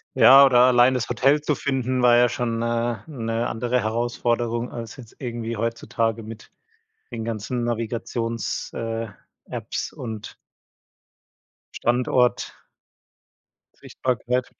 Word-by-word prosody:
Ja, 135 +1 +9
oder 125 -2 +4
allein 125 0 +5
das 125 -2 -1
Hotel 135 +5 +3
zu 150 -1 -1
finden, 130 -2 -1
war 120 -1 +6
ja 120 0 +5
schon 115 -1 -2
'ne 115 0 -1
'ne 115 -5 -2
andere 120 +2 -1
Herausforderung 120 +1 -1
als 115 +2 -8
jetzt 120 -4 -13
irgendwie 115 -3 -4
heutzutage 115 0 -2
mit 110 0 -11 0.6
den 115 -2 -5
ganzen 115 +2 -3
Navigations 115 0 -3
äh, 115 0 -4 0.4
Apps - - -5
und 110 -3 -7 1.4
Standort 125 +1 +1 1.2
sichtbarkeit. 125 0 -2
120 Hz, 110 wpm, -23 LUFS, 115-125 Hz, 1.4 s, Ja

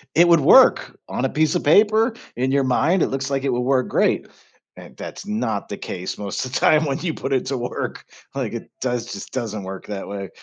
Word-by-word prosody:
it 175 +2 +6
would 170 -2 +6
work 135 - +5
on 130 - -2
a - - 0
piece 155 +3 +1
of - - 0
paper, 215 - +4 0.2
in 130 +2 0
your 140 -1 +2
mind 155 +8 +2
it - - +3
looks 135 +1 -3
like 135 -1 -1
it 135 - 0
would 120 - 0
work 130 0 +1
great. - - +1 0.5
And, - - -13
that's - - -8
not 110 -1 -2
the 100 - -5
case 90 0 -6
most 100 +5 -3
of 130 - -8
the - - 0
time 155 0 +4
when 140 -1 -2
you 170 -3 -2
put 135 - -3
it 130 - 0
to 135 -1 -1
work, 120 +1 -5 0.3
like, - - -3
it - - -7
does 125 -2 -2
just 100 - -8
doesn't 110 -5 -4
work 95 0 -8
that 100 -2 -5
way. 100 -3 -6
130 Hz, 235 wpm, -22 LUFS, 110-150 Hz, 0.5 s, it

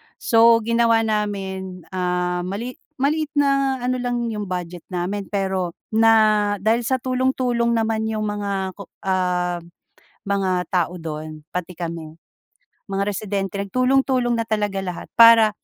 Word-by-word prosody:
So 230 -1 +4
ginawa 230 0 +3
namin 195 -4 -3
ah, 180 -1 -1
mali 230 +7 -5 0.2
maliit 300 +3 0
na 275 -2 +2
ano 255 0 0
lang 240 -1 -2
'yung 210 -2 -4
budget 180 -2 -5
namin 190 +2 -3
pero 190 -3 -2 0.2
na 215 -2 +4
dahil 225 +2 +3
sa 260 - +2
tulong-tulong 255 -2 0
naman 220 -1 0
'yung 215 -1 -2
mga 200 -2 -2 0.3
ah, 180 -2 0 0.7
mga 195 -1 +1 0.2
tao 180 -1 0
do'n 155 -1 -6
pati 180 0 -4
kami 165 -2 -6 0.7
mga 195 0 -2
residente 200 -1 -3
nag 200 -1 -5
tulong-tulong 255 -2 +2
na 230 - -1
talaga 210 -3 -1
lahat, 180 -2 -5
para 230 -1 +8
205 Hz, 130 wpm, -22 LUFS, 185-235 Hz, 0.7 s, para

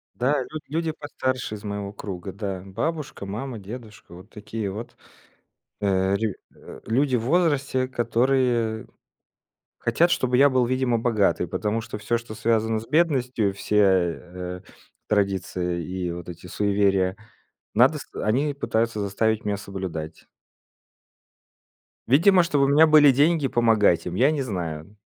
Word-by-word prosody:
Да, 135 +2 +1
люд 155 +3 -7
люди 160 +1 -1
постарше 130 -6 -3
из 105 - -10
моего 100 -1 -4
круга. 95 -2 -7
Да, 95 -2 -5
бабушка, 145 - -4
мама, 115 +4 -5
дедушка. 105 -2 -10
Вот 90 +5 -14
такие 105 -1 -5
вот, 110 +4 -8 0.9
э, 95 -1 +2
рю 110 -1 -1 0.2
э, - - -12
люди 130 +3 +2
в 115 - 0
возрасте, 140 -4 +1
которые 120 -2 0 0.9
хотят, 170 +1 +2
чтобы 125 -5 +1
я 140 +2 +6
был, 130 -1 +2
видимо, 130 -2 +1
богатый. 105 -6 +1
Потому 105 +4 -1
что 110 -1 -7
всё, 120 +2 0
что 115 -2 -9
связано 110 0 +1
с 115 - -12
бедностью, 130 - +1
все, 105 +1 -1
э, 90 -1 0 0.5
традиции 95 -4 -1
и 90 -1 -4
вот 85 0 -8
эти 85 +1 -9
суеверия, 100 -1 +1 0.6
надо - - +4
с - - -8 0.2
они 140 +7 +1
пытаются 115 -5 -1
заставить 110 +2 0
меня 105 -1 -1
соблюдать. 95 -6 -7 1.8
Видимо, 180 - +5
чтобы 145 -5 +2
у - - +2
меня 155 +3 +6
были 150 -2 +7
деньги 145 +2 +3
помогать 115 -7 +3
им, 90 - -4
я 130 +9 +4
не 145 -3 -1
знаю. 85 -4 -5
110 Hz, 140 wpm, -24 LUFS, 100-130 Hz, 1.8 s, были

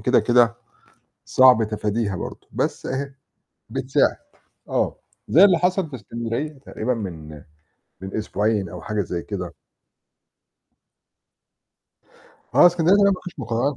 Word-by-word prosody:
كده، - - +3
كده 120 -1 +3 0.7
صعب 130 -3 +5
تفاديها 105 -1 -2
برضه 90 - -7
بس، - - -2
أهي 140 +1 -3 0.6
بتساعد - - +1 0.5
آه. - - -1 0.3
زي 175 - +6
اللي 190 -4 +6
حصل 180 -1 0
في 135 - -7
إسكندرية 120 +6 -4
تقريبًا 130 -1 -3
من 80 -9 -7 0.6
من 95 +1 -8
أسبوعين 105 -2 -1
أو - - -8
حاجة 105 -1 -2
زي 85 -2 -4
كده. - - -6 3.0
آه، - - +8
إسكندرية 175 +1 +4
دي 205 - +4
لأ، 200 - +5
ما 185 - -2
فيش 180 -3 -9
مُقارنات 120 +3 -1
120 Hz, 125 wpm, -22 LUFS, 105-155 Hz, 3.0 s, آه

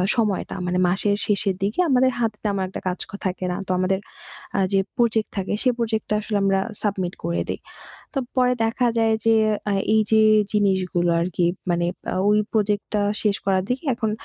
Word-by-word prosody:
সময়টা 215 -5 0
মানে 180 0 0
মাসের 200 +3 +1
শেষের 200 -2 +1
দিকে 210 - -1
আমাদের 260 -1 +4
হাতে 220 -3 0
তেমন 200 -2 0
একটা - - -6
কাজ 180 - -1 0.3
থাকে 185 0 -2
না। 180 - -2
তো - - -2
আমাদের 190 +1 +1 0.6
আ - - +3
যে, 195 - +4 0.2
প্রজেক্ট 225 -3 +2
থাকে 195 +1 -2
সেই 250 -2 +3
প্রজেক্টটা 220 -2 -1
আসলে 210 -1 -2
আমরা 195 -1 +3 0.2
সাবমিট 190 -4 -1
করে 170 0 -1
দেই। - - -3 0.6
তো 275 - 0 0.2
পরে 250 0 +4
দেখা 230 +2 +1
যায় 225 -1 +3
যে, 225 - +6 0.4
আ - - +1 0.2
এই 220 - +5
যে, 220 - +5 0.3
জিনিসগুলো 190 -4 +1
আরকি 175 0 0 0.2
মানে 175 0 +1 0.4
ওই 210 0 +4
প্রজেক্টটা 210 -1 0 0.2
শেষ 205 -2 +2
করার 190 -1 +2
দিকে 255 +5 -2
এখন 225 -2 -1
205 Hz, 175 wpm, -23 LUFS, 190-225 Hz, 0.6 s, যে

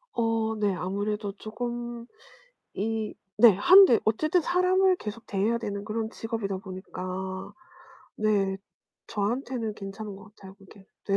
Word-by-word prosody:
어 225 -1 +1
네 205 -2 +2
아무래도 205 +3 -2
쪼금 240 +2 -5 0.7
이 220 +1 -2 0.2
네 235 0 +9
하는데 365 - +7
어쨌든 310 +11 +2
사람을 365 +2 +3
계속 215 -2 -7
대해야 210 +4 0
되는 205 -3 -4
그런 220 +1 -2
직업이다 225 -4 -4
보니까 190 0 -6 0.6
네 200 -3 +1 0.5
저한테는 225 +1 -2
괜찮은 195 0 -7
것 205 +1 -15
같아요 190 -1 -12
그게. 195 0 -18 0.2
네. 195 - +3
215 Hz, 270 characters per minute, -27 LUFS, 195-235 Hz, 0.7 s, 네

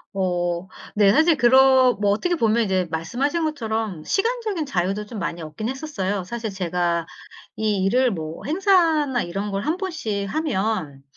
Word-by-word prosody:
어 175 -1 -1 0.3
네 200 -2 +5
사실 315 +2 +4
그러 260 +1 +6
뭐 205 -1 +2
어떻게 350 - 0
보면 230 -4 +2
이제 185 -2 0
말씀하신 275 - -1
것처럼 220 - -3
시간적인 430 - -1
자유도 195 -1 -1
좀 230 - -8
많이 175 -3 -4
얻긴 160 +9 -5
했었어요. 205 - -3
사실 225 +3 -5
제가 175 -2 -1 0.5
이 210 -3 0
일을 245 +5 +3
뭐 160 -3 -6
행사나 320 - +2
이런 195 +4 -4
걸 195 +1 -2
1 320 +3 0
번씩 270 - -3
하면 200 - -2
220 Hz, 295 characters per minute, -23 LUFS, 185-290 Hz, 0.5 s, 그러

